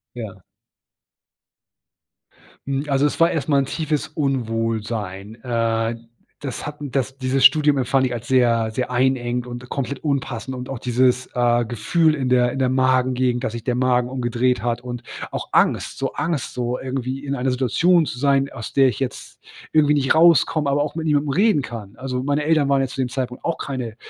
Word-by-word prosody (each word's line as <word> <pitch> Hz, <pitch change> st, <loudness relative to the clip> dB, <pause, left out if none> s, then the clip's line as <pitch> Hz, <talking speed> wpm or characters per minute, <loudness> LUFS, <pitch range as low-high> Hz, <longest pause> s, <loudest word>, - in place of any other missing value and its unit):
Ja. 100 Hz, -6 st, -8 dB, 2.2 s
Hm, 140 Hz, +1 st, -1 dB
also 140 Hz, 0 st, +2 dB
es 145 Hz, -, -1 dB
war 165 Hz, +1 st, +5 dB
erst 155 Hz, -3 st, -2 dB
mal 140 Hz, -, +4 dB
'n 135 Hz, -, +1 dB
tiefes 155 Hz, +1 st, -2 dB
Unwohlsein. 115 Hz, -7 st, -2 dB
Äh, 115 Hz, -1 st, 0 dB, 0.4 s
das 135 Hz, -1 st, -5 dB
hatten 150 Hz, -2 st, -7 dB
das 135 Hz, 0 st, -2 dB
dieses 130 Hz, 0 st, +2 dB
Studium 150 Hz, -2 st, +5 dB
empfand 130 Hz, +1 st, +2 dB
ich 125 Hz, -, -2 dB
als 120 Hz, -1 st, -6 dB
sehr, 120 Hz, -3 st, +3 dB
sehr 125 Hz, +3 st, -3 dB
einengend 125 Hz, -1 st, 0 dB
und 125 Hz, 0 st, -8 dB
komplett 140 Hz, 0 st, -4 dB
unpassend. 130 Hz, -3 st, -2 dB
Und 125 Hz, 0 st, -6 dB
auch 135 Hz, -, -5 dB
dieses, 125 Hz, +1 st, +1 dB
äh, 120 Hz, -1 st, +2 dB
Gefühl 150 Hz, +8 st, +1 dB
in 135 Hz, -3 st, -2 dB
der 125 Hz, -1 st, +3 dB
in 135 Hz, -, -4 dB
der 130 Hz, -, +2 dB
Magengegend, 130 Hz, -1 st, +1 dB
dass 115 Hz, -, -3 dB
sich 115 Hz, -1 st, -6 dB
der 125 Hz, 0 st, -1 dB
Magen 125 Hz, -1 st, +1 dB
umgedreht 125 Hz, 0 st, 0 dB
hat 120 Hz, 0 st, -1 dB
und 120 Hz, -1 st, -6 dB, 0.3 s
auch -, -, -4 dB
Angst. -, -, +2 dB
So -, -, -2 dB
Angst, 150 Hz, -1 st, -2 dB
so 125 Hz, 0 st, -2 dB
irgendwie 130 Hz, +1 st, -4 dB
in 140 Hz, -1 st, -2 dB
einer 130 Hz, 0 st, -1 dB
Situation 160 Hz, +7 st, +3 dB
zu 125 Hz, -2 st, -6 dB
sein, 140 Hz, 0 st, +2 dB
aus 115 Hz, -, -7 dB
der 135 Hz, -1 st, +5 dB
ich 115 Hz, -, -5 dB
jetzt 135 Hz, -2 st, -5 dB, 0.3 s
irgendwie 150 Hz, -1 st, +4 dB
nicht 140 Hz, -1 st, +2 dB
rauskomme, 160 Hz, -2 st, +4 dB
aber 145 Hz, +1 st, +2 dB
auch 150 Hz, -, -5 dB
mit 165 Hz, -1 st, -3 dB
niemandem 150 Hz, -1 st, +1 dB
reden 195 Hz, +1 st, +3 dB
kann. 110 Hz, -6 st, -8 dB
Also, 130 Hz, -1 st, -4 dB
meine 145 Hz, +2 st, 0 dB
Eltern 155 Hz, -2 st, +2 dB
waren 140 Hz, -1 st, +3 dB
ja 135 Hz, -, 0 dB
zu 135 Hz, -, -10 dB
dem 130 Hz, -, +1 dB
Zeitpunkt 125 Hz, -1 st, -5 dB
auch 170 Hz, -, -1 dB
keine 125 Hz, -5 st, -5 dB
130 Hz, 190 wpm, -21 LUFS, 120-140 Hz, 2.2 s, war